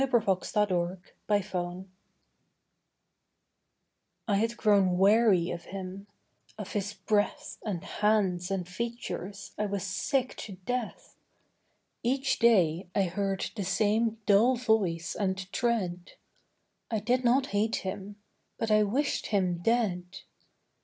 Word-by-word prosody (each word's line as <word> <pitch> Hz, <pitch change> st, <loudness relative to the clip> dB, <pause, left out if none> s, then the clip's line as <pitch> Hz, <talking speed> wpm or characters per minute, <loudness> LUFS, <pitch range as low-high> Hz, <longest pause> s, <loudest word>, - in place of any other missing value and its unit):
THOU 270 Hz, -, +3 dB, 0.4 s
SHALT 210 Hz, -2 st, +1 dB, 0.6 s
NOT 205 Hz, -1 st, +3 dB
KILL 180 Hz, -2 st, -4 dB, 2.4 s
I 205 Hz, -, +2 dB
had 230 Hz, +3 st, 0 dB
grown 195 Hz, -4 st, +3 dB
weary 195 Hz, -3 st, +4 dB
of 170 Hz, 0 st, -6 dB
him; 195 Hz, +1 st, -7 dB, 0.5 s
of 210 Hz, -3 st, -6 dB
his 205 Hz, 0 st, -2 dB
breath 205 Hz, +2 st, -1 dB
And 190 Hz, -6 st, -3 dB
hands 195 Hz, -4 st, +1 dB
and 190 Hz, -3 st, -2 dB
features 200 Hz, -2 st, -5 dB
I 210 Hz, -, +1 dB
was 200 Hz, -2 st, -3 dB
sick 225 Hz, +7 st, -1 dB
to 205 Hz, -, -7 dB
death. 250 Hz, -, -4 dB, 0.8 s
Each 265 Hz, +3 st, 0 dB
day 185 Hz, -7 st, +3 dB
I 200 Hz, -, +3 dB
heard 195 Hz, +1 st, -2 dB
the 205 Hz, -, -2 dB
same 220 Hz, +4 st, +1 dB
dull 220 Hz, +5 st, +5 dB
voice 210 Hz, -9 st, 0 dB
and 190 Hz, -2 st, 0 dB, 0.2 s
tread; 185 Hz, -7 st, -1 dB, 0.8 s
I 225 Hz, -, 0 dB
did 245 Hz, +5 st, +1 dB
not 255 Hz, +3 st, +4 dB
hate 215 Hz, +2 st, +1 dB
him: 195 Hz, +1 st, -5 dB, 0.4 s
but 225 Hz, -1 st, -1 dB
I 215 Hz, 0 st, +5 dB
wished 255 Hz, +8 st, 0 dB
him 185 Hz, -4 st, +1 dB
dead. 210 Hz, -5 st, +1 dB
205 Hz, 120 wpm, -29 LUFS, 185-225 Hz, 2.4 s, dull